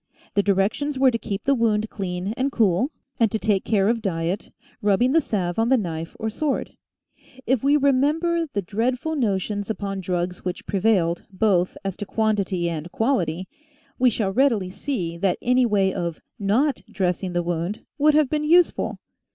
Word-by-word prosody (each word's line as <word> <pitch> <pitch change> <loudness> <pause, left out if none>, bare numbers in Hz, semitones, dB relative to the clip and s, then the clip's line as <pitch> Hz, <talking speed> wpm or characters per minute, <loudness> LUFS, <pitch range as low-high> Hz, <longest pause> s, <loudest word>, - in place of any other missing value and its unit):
The 200 - +3
directions 205 +9 0
were 260 -1 +5
to 230 - -2
keep 200 -3 -4
the 275 - +3
wound 220 -3 +1
clean 190 0 -3
and 265 +2 0
cool, 220 +2 +2 0.3
and 225 -3 +3
to - - 0
take 210 -3 +1
care 200 -2 +2
of 230 0 +1
diet, 175 -1 -2 0.3
rubbing 210 +5 +3
the 325 +3 +4
salve 185 - -2
on 225 +1 +2
the 265 - +5
knife 165 -6 -4
or 220 - -2
sword. 285 +5 -2 0.7
If 260 -2 +1
we 285 +2 +4
re 280 -1 +4
member 325 +5 +1
the 200 -4 -2
dreadful 250 - -1
notions 205 - -1
upon 200 -2 -3
drugs 180 0 -2
which 180 -1 -4
prevailed, 190 -4 +1
both 185 -2 +1
as 195 -2 -2
to 205 - -6
quantity 200 -6 0
and 165 0 -4
quality, 185 - 0 0.5
we 250 0 +5
shall 205 -4 -1
readily 230 -8 +2
see 185 -9 -3
that 180 0 +1
any 250 0 +3
way 195 -3 +2
of 170 -2 -3 0.2
not 235 +9 +1
dressing 185 -3 -1
the 175 0 0
wound, 175 +4 -3
would 300 +1 +5
have 305 -2 +4
been 300 +2 -1
use 340 +3 +5
ful. - - -4
210 Hz, 180 wpm, -23 LUFS, 185-255 Hz, 0.7 s, were